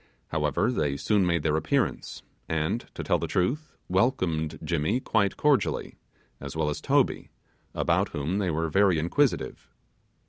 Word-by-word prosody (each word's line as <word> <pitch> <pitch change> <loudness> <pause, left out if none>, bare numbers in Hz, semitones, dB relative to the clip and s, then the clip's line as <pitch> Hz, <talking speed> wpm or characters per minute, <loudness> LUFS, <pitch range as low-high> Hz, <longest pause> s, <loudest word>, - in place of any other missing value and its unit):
However, 75 - +1
they 75 - -1
soon 100 +3 +2
made 85 -3 +1
their 75 -1 +1
appearance, 130 - -1 0.3
and 80 +8 -1
to - - -4
tell - - +1
the - - -3
truth, 140 - -1
welcomed 90 - 0
Jimmy 85 +8 0
quite 100 -6 +1
cordially, 150 -3 +1 0.4
as 70 +1 -7
well 80 -1 0
as - - -5
Toby, - - +1 0.5
about - - +1
whom 80 +7 -2
they 95 -3 0
were 80 +1 0
very 95 +1 +3
inquisitive. 85 - 0
85 Hz, 145 wpm, -27 LUFS, 75-110 Hz, 0.5 s, very